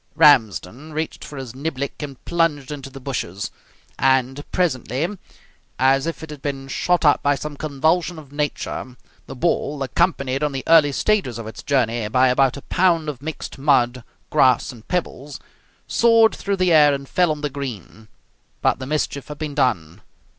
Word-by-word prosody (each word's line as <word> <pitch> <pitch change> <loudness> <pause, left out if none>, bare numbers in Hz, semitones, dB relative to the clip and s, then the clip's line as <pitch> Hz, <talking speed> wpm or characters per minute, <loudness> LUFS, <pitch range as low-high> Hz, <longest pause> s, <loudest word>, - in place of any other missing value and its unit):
Ramsden 140 - +3
reached 155 +1 -4
for 145 - -9
his 130 -3 -7
niblick 140 0 -4
and 140 -3 -8
plunged 160 -5 0
into 140 -2 -7
the 135 0 -10
bushes. 105 -8 -4 0.5
And, 135 +1 +2
presently, 145 -4 0 0.7
as 135 +3 +3
if 165 - -4
it 160 - -8
had 150 -2 -9
been 135 -1 -4
shot 175 +5 +1
up 145 - +5
by 145 0 +2
some 150 +1 -6
convulsion 160 +5 0
of 145 -3 -12
nature, 145 -3 -4 0.3
the - - -8
ball, 145 -1 0
accompanied 135 -3 0
on 150 -1 0
the 135 - -4
early 160 -3 +6
stages 185 - 0
of 115 - -7
its 110 - -8
journey 120 -5 0
by 130 +3 +3
about 135 +1 +2
a 140 - -10
pound 170 -4 +2
of 135 -3 -6
mixed 155 -2 -6
mud, 125 -3 +2 0.3
grass, 130 -2 +3
and 115 -3 -15
pebbles, 150 -6 -3 0.5
soared 230 -1 +4
through 200 0 -2
the 180 -2 +3
air 150 -2 +6
and 140 0 -8
fell 180 +3 +2
on 150 -1 -2
the 150 - -1
green. 115 -5 -7 0.6
But - - +2
the 130 - -6
mischief 145 -2 -2
had 150 - -8
been 150 -1 -4
done. 95 - 0
140 Hz, 175 wpm, -21 LUFS, 130-155 Hz, 0.7 s, early